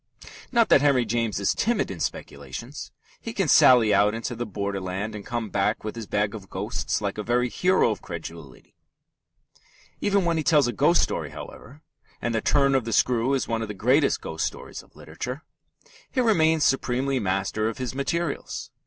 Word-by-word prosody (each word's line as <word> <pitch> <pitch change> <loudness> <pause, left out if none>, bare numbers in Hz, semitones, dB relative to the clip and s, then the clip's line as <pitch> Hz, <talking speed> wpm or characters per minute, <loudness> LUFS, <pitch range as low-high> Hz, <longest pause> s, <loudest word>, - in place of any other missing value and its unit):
Not 235 -3 +3
that - - +6
Henry 140 -4 +3
James 115 -2 -1
is 100 - +1
timid 230 - 0
in 90 - -7
speculations. 70 - -6 0.3
He 230 - -6
can 195 -6 0
sally 120 -6 +6
out 105 +2 +3
into 115 +2 -4
the 120 +1 -4
borderland 100 0 -4
and 105 -1 -7
come 115 -2 -4
back 100 +2 0
with 110 +1 -5
his 115 -3 -7
bag 105 +1 0
of 100 -4 -9
ghosts - - -3
like - - -3
a - - -2
very 120 +3 +1
hero 180 -4 +2
of 105 - -5
credulity. 80 - -9 1.3
Even 200 -2 +1
when 170 -1 +1
he 155 - 0
tells 150 -2 +4
a 120 - -2
ghost - - +3
story, - - -3
however 145 +4 -11 0.4
and 120 - -2
The 110 - 0
Turn 140 -1 +3
of 130 -4 +1
the 115 - -3
Screw 125 +2 +2
is 135 - -2
one 115 -1 -1
of 110 - -3
the 105 - -6
great 130 +9 +3 0.2
ghost 80 - -2
stories - - -8
of - - -25
literature 130 +6 -7 0.7
he 260 - -2
remains 160 -10 +3
supremely 135 0 +1
master 100 +2 -1
of 115 - -7
his 125 -2 -4
materials. 140 +3 -3
120 Hz, 190 wpm, -25 LUFS, 105-140 Hz, 1.3 s, that